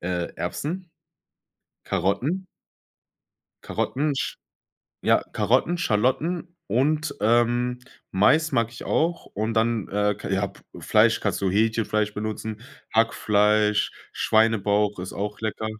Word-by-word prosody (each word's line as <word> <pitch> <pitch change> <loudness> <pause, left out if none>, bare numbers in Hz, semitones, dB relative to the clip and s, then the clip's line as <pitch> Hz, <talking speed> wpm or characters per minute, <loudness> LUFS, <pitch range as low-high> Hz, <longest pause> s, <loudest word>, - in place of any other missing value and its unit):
äh, 90 -1 -3
Erbsen, 175 +3 -4 0.9
Karotten 120 - -1 1.2
Karotten, 145 +1 -1
sch - - -3 0.7
ja, - - +4
Karotten, 175 - +2
Schalotten 165 +7 0
und, 150 +7 +1
ähm, 120 +2 +2 0.3
Mais 155 +11 +3
mag 115 -3 +1
ich 120 - -9
auch. 170 +2 0
Und 110 +3 -3
dann, 115 -2 +1
äh, 105 0 +1
kei - - -6
ja 95 +1 +1
p - - -14 0.2
Fleisch 110 +1 +3
kannst 100 -1 -1
du 95 - +2
Hähnchenfleisch 110 0 +1
benutzen, 110 +1 -4 0.3
Hackfleisch, 105 -1 +3 0.2
Schweinebauch 105 -2 +2
ist 90 - -6
auch 105 +1 -4
lecker. 110 0 -3
110 Hz, 115 wpm, -24 LUFS, 105-130 Hz, 1.2 s, ja